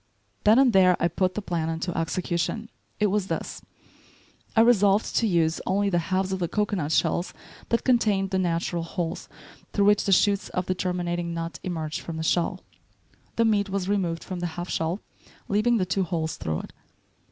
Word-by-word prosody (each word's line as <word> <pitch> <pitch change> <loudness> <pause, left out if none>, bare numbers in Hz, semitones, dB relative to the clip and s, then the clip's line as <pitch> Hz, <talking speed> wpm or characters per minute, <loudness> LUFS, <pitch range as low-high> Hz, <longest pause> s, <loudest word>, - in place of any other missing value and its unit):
Then 215 +2 +7
and 260 -3 +5
there 185 -2 +5
I 170 - +3
put 185 +2 -1
the 215 - -3
plan 165 -4 -2
into 165 +2 -3
execution. 170 +6 -2 0.3
It 210 -2 +2
was 205 -2 0
this: - - -4 0.9
I 225 - +6
resolved 205 -3 +4
to 230 - +3
use 165 -4 +1
only 200 +1 +1
the 175 - +2
halves 190 0 0
of 190 - -1
the 175 - 0
cocoanut 200 -6 -1
shells 175 +2 +1 0.3
that 230 - +1
contained 210 -6 +2
the 190 - +1
natural 170 -1 -1
holes 165 0 -4 0.4
through 200 - +3
which 205 0 +4
the 195 - +1
shoots 200 +1 +3
of 180 - 0
the 185 - 0
germinating 175 -2 -2
nut 165 0 -4
emerge 160 -4 -4
from 165 -1 -6
the 160 - -3
shell. 170 +1 0 0.7
The 230 - +3
meat 205 -2 +2
was 190 -1 -2
removed 180 -5 -1
from 185 -2 -5
the 175 - -1
half 175 +1 -4
shell, 165 +5 -1 0.5
leaving 215 +4 +2
the 185 - +1
two 185 +2 0
holes 160 -3 -2
through 80 -3 -3
it. - - -12
185 Hz, 185 wpm, -26 LUFS, 170-205 Hz, 0.9 s, Then